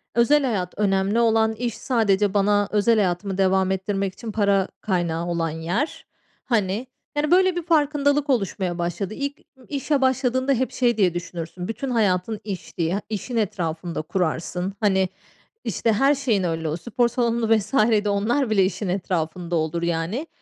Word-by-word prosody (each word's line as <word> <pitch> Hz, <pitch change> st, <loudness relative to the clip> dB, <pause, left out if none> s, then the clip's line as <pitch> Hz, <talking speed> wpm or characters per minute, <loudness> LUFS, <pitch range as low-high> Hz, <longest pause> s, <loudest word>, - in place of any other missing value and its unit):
Özel 280 Hz, +5 st, +4 dB
hayat 195 Hz, -8 st, -1 dB
önemli 200 Hz, +1 st, +1 dB
olan, 225 Hz, -1 st, +3 dB
iş 235 Hz, +1 st, -3 dB
sadece 205 Hz, -5 st, +1 dB
bana 205 Hz, 0 st, +3 dB
özel 215 Hz, +2 st, +3 dB
hayatımı 190 Hz, -1 st, 0 dB
devam 190 Hz, 0 st, +2 dB
ettirmek 195 Hz, 0 st, -1 dB
için 225 Hz, +2 st, -7 dB
para 200 Hz, -2 st, +2 dB
kaynağı 175 Hz, -4 st, -1 dB
olan 170 Hz, -1 st, -1 dB
yer. 170 Hz, -, -3 dB, 0.4 s
Hani, 215 Hz, 0 st, 0 dB, 0.3 s
yani, 300 Hz, +2 st, +1 dB
böyle, 370 Hz, 0 st, +5 dB
bir 350 Hz, -, -2 dB
farkındalık 295 Hz, -2 st, +2 dB
oluşmaya 195 Hz, -7 st, 0 dB
başladı. 175 Hz, +4 st, -3 dB
İlk 280 Hz, +4 st, -4 dB, 0.3 s
işe 285 Hz, 0 st, -1 dB
başladığında 260 Hz, 0 st, +2 dB
hep 260 Hz, 0 st, -1 dB
şey 240 Hz, -3 st, +1 dB
diye 185 Hz, -5 st, +3 dB
düşünürsün, 175 Hz, 0 st, -6 dB
bütün 235 Hz, +5 st, -4 dB
hayatın 210 Hz, -2 st, +1 dB
iş 195 Hz, -4 st, -7 dB
diye, 175 Hz, +4 st, 0 dB
işin 220 Hz, +3 st, -4 dB
etrafında 170 Hz, -5 st, -2 dB
kurarsın. 180 Hz, +2 st, -2 dB
Hani, 190 Hz, -3 st, +2 dB, 0.5 s
işte, 225 Hz, -2 st, 0 dB
her 275 Hz, +7 st, +3 dB
şeyin 235 Hz, -9 st, 0 dB
öyle, 165 Hz, -2 st, -1 dB
o 155 Hz, -, -2 dB
spor 240 Hz, +5 st, 0 dB
salonu 235 Hz, -2 st, +2 dB
vs. 210 Hz, +4 st, -6 dB, 0.3 s
de 210 Hz, -, 0 dB
onlar 225 Hz, +6 st, +1 dB
bile 200 Hz, -3 st, +4 dB
işin 190 Hz, +1 st, -3 dB
etrafında 175 Hz, -2 st, -2 dB
olur, 160 Hz, +1 st, -1 dB
yani. 170 Hz, -, -2 dB
205 Hz, 155 wpm, -23 LUFS, 180-240 Hz, 0.5 s, böyle